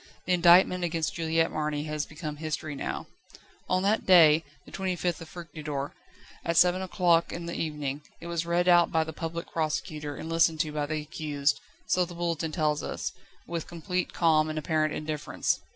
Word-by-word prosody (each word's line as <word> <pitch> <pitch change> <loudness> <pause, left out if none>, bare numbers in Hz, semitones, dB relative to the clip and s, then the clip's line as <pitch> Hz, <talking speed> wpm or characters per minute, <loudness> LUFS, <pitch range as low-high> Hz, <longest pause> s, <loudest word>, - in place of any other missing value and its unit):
The 180 - +2
indictment 180 +1 +6
against 165 -2 -1
Juliette 165 -1 +1
Marny 150 -1 -2
has 150 -1 -3
become 150 -1 -6
history 155 0 -4
now. 140 - -4 0.6
On 185 +1 +2
that 210 +3 +2
day, 165 -4 +7 0.2
the - - -14
25th 180 -3 -2
Fructidor, 155 -5 -5 0.5
at 170 0 0
seven 180 +2 +5
o'clock 175 -3 +2
in 170 0 -5
the 170 - -4
evening, 150 -3 -3 0.2
it - - -10
was 170 -1 -2
read 170 +1 +1
out 175 -1 +6
by 160 -1 +3
the 160 0 -7
Public 165 +2 -5
Prosecutor, 150 -2 -2
and - - -7
listened 165 -1 +3
to 155 -3 -2
by 150 -1 -2
the 155 0 -2
accused 150 -2 -1 0.3
so 180 - +2
the 175 0 -7
Bulletin 170 -2 -2
tells 155 -3 0
us - - -4 0.3
with 170 -2 -4
complete 175 +2 -3
calm 155 -2 +3
and 155 - -4
apparent 155 0 +1
indifference. 150 -1 -2
160 Hz, 175 wpm, -28 LUFS, 155-175 Hz, 0.6 s, day